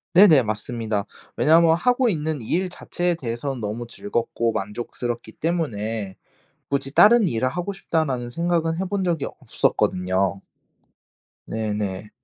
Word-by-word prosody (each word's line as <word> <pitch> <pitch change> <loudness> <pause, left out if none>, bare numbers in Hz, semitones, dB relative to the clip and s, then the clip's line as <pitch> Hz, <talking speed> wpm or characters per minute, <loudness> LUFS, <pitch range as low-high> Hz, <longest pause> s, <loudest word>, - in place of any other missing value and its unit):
네네. 170 -8 +8
맞습니다. 110 -1 -2 0.3
왜냐하면 165 +1 +5
하고 245 +8 +2
있는 155 - -1
일 180 +11 -1
자체에 175 0 -2
대해선 130 -1 -4
너무 110 +3 -4
즐겁고 115 +2 -2
만족스럽기 115 +3 -4
때문에 110 - -2 0.6
굳이 135 -1 -1
'다른 215 -1 +7
일을 125 0 0
하고 180 +6 -3
싶다.'라는 135 -10 -1
생각은 165 +2 0
해 190 - -1
본 200 +1 -1
적이 170 -5 0
없었거든요. 95 +2 0 1.1
네네. 105 -2 -3
130 Hz, 295 characters per minute, -23 LUFS, 110-170 Hz, 1.1 s, 네네